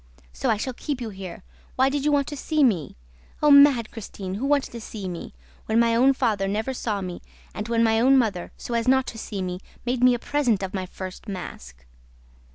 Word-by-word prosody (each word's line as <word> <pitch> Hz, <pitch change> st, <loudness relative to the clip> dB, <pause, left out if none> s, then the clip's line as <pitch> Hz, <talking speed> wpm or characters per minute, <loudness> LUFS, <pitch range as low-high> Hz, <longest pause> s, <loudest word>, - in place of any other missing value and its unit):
So -, -, -2 dB
I -, -, +3 dB
shall 255 Hz, +5 st, -3 dB
keep 280 Hz, +2 st, -4 dB
you 230 Hz, -3 st, -5 dB
here!... 190 Hz, -2 st, -8 dB, 0.3 s
Why 265 Hz, -, +4 dB
did 280 Hz, 0 st, -2 dB
you 300 Hz, -, +3 dB
want 285 Hz, -1 st, +3 dB
to 295 Hz, -, -5 dB
see 305 Hz, +2 st, +1 dB
me? 185 Hz, -, +1 dB, 0.5 s
Oh, 300 Hz, -, +6 dB
mad 280 Hz, -5 st, +6 dB
Christine, 195 Hz, -4 st, -7 dB
who 235 Hz, +8 st, -2 dB
wanted 285 Hz, -1 st, +1 dB
to 235 Hz, -, -7 dB
see 210 Hz, -3 st, -6 dB
me!... 175 Hz, -, -7 dB, 0.3 s
When 220 Hz, +1 st, +2 dB
my 230 Hz, 0 st, +3 dB
own 260 Hz, +4 st, +5 dB
father 210 Hz, -6 st, 0 dB
never 220 Hz, +6 st, -1 dB
saw 215 Hz, -5 st, -2 dB
me 180 Hz, -2 st, -6 dB, 0.3 s
and 210 Hz, +1 st, -5 dB
when 230 Hz, 0 st, +2 dB
my 225 Hz, 0 st, +3 dB
mother, 235 Hz, -8 st, +3 dB
so 240 Hz, -, -6 dB
as 230 Hz, 0 st, 0 dB
not 265 Hz, 0 st, +4 dB
to 225 Hz, -, -9 dB
see 200 Hz, -3 st, -4 dB
me, 180 Hz, 0 st, -4 dB, 0.3 s
made 245 Hz, 0 st, 0 dB
me 250 Hz, -1 st, +6 dB
a -, -, -2 dB
present 240 Hz, -6 st, 0 dB
of 190 Hz, -, -4 dB
my 190 Hz, -2 st, -3 dB
first 185 Hz, +3 st, -8 dB
mask!' 65 Hz, -, -8 dB
230 Hz, 220 wpm, -24 LUFS, 195-260 Hz, 0.5 s, Oh